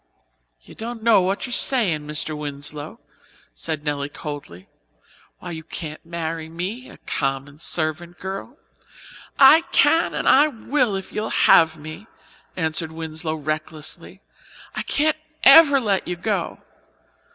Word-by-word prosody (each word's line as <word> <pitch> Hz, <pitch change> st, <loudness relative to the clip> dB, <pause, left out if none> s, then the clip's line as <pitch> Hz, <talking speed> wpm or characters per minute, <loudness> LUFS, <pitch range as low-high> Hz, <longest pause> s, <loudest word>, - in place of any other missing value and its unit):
"You -, -, -14 dB
don't 230 Hz, 0 st, -7 dB
know 225 Hz, -4 st, +5 dB
what 190 Hz, +2 st, -1 dB
you're 250 Hz, -, -6 dB
sayin', 185 Hz, -, +2 dB
Mr. 155 Hz, +1 st, -1 dB
Winslow," 145 Hz, 0 st, -6 dB, 0.5 s
said 145 Hz, -, -5 dB
Nelly 145 Hz, -1 st, -2 dB
coldly. 145 Hz, -, -8 dB, 0.7 s
"Why, 175 Hz, -, -8 dB
you 160 Hz, -1 st, -7 dB
can't 155 Hz, -1 st, -7 dB
marry 165 Hz, -1 st, -5 dB
me 190 Hz, +10 st, -5 dB
a -, -, -14 dB
common 135 Hz, +1 st, -3 dB
servant 170 Hz, +2 st, -1 dB
girl." 195 Hz, +8 st, -7 dB, 0.8 s
"I 280 Hz, +4 st, +8 dB
can 325 Hz, +4 st, +3 dB
and -, -, -2 dB
I 285 Hz, +3 st, +6 dB
will, 250 Hz, -3 st, -1 dB
if 195 Hz, -1 st, -7 dB
you'll 215 Hz, +1 st, -3 dB
have 160 Hz, 0 st, +4 dB
me," 155 Hz, +8 st, -10 dB, 0.5 s
answered 160 Hz, -1 st, -1 dB
Winslow 160 Hz, 0 st, -5 dB
recklessly. 155 Hz, 0 st, -5 dB, 0.5 s
"I -, -, -2 dB
can't 310 Hz, +1 st, 0 dB, 0.3 s
ever 285 Hz, -1 st, +8 dB
let 200 Hz, -6 st, -1 dB
you 180 Hz, -, -2 dB
go. 185 Hz, 0 st, -2 dB
165 Hz, 130 wpm, -22 LUFS, 155-220 Hz, 0.8 s, I